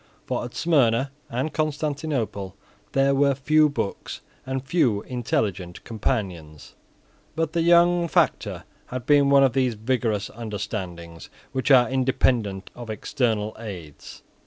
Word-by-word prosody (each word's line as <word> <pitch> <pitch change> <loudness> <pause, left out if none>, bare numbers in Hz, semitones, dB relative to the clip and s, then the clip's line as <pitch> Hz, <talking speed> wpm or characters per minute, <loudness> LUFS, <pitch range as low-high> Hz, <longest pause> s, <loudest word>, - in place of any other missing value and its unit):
For - - -2
at 120 - -8
Smyrna 135 -5 +2 0.2
and 130 +6 -2
Constantinople 145 - -2 0.4
there 135 0 +3
were 140 0 +3
few 150 +3 +3
books 120 -8 -4 0.3
and 130 0 -3
few 130 - +1
intelligent 105 -8 -2
companions. 90 - -4 0.6
But 160 -1 -1
the 170 - +1
young 170 +1 +4
factor - - 0 0.2
had 125 -1 -6
one 140 -1 +5
of 130 -3 +3
those 130 -3 +1
vigorous 110 -2 -1
understandings 100 -7 -6 0.2
which 130 +3 -2
are 125 -3 +7
independent 125 -6 0
of 120 -2 -9
external 110 -1 -1
aids. 90 -10 -9
125 Hz, 120 wpm, -24 LUFS, 105-140 Hz, 0.6 s, are